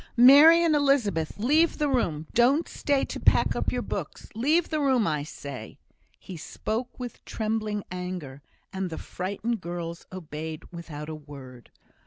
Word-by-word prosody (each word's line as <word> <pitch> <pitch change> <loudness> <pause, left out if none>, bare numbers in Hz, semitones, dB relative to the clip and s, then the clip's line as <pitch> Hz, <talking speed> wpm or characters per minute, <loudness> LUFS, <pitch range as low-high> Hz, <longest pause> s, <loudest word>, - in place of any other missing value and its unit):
"Mary 290 +7 +8
and 325 -2 +3
Elizabeth, 245 - +1
leave 300 +10 +3
the 300 - +1
room. 170 - 0
Don't 270 +7 +3
stay 285 -2 0
to - - -6
pack - - +3
up - - -1
your - - -2
books. - - -6
Leave 300 +10 +2
the 310 - -1
room, 260 -6 +2
I 150 -4 0
say!" 140 -5 -8 0.4
He 185 - -9
spoke 225 +10 -4
with 245 -1 -7
trembling 215 -2 -2
anger, 180 -7 -6 0.3
and 190 -1 -2
the 160 - -6
frightened 200 +4 -4
girls 170 -1 -6
obeyed 160 -3 -6
without 160 -3 -8
a 160 - -5
word. 140 -5 -11
200 Hz, 155 wpm, -26 LUFS, 160-265 Hz, 0.4 s, Mary